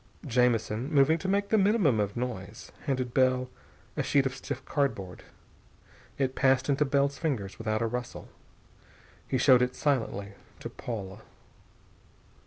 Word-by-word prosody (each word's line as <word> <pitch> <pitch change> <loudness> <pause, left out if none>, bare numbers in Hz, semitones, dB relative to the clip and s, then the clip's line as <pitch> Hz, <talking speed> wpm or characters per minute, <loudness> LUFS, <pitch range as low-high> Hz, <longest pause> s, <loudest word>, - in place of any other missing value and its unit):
Jamison 120 0 +1
moving 150 +2 +4
to 190 - -4
make 200 +1 +1
the 220 - +4
minimum 195 - +3
of 100 +2 -1
noise 115 -4 -5 0.2
handed 130 -3 -1
Bell 130 -1 +2 0.4
a - - 0
sheet 140 -1 +2
of 135 -1 -2
stiff 135 0 -6
cardboard. 100 - -2 1.0
It 130 -2 0
passed 130 0 +2
into 140 +1 +2
Bell's 140 0 +1
fingers 120 - -3
without 110 0 -1
a - - +1
rustle. 120 +1 -5 1.0
He 130 - 0
showed 130 -1 +6
it 125 0 0
silently 110 -8 -1 0.3
to - - -7
Paula. 105 -3 -6
130 Hz, 140 wpm, -28 LUFS, 115-140 Hz, 1.0 s, showed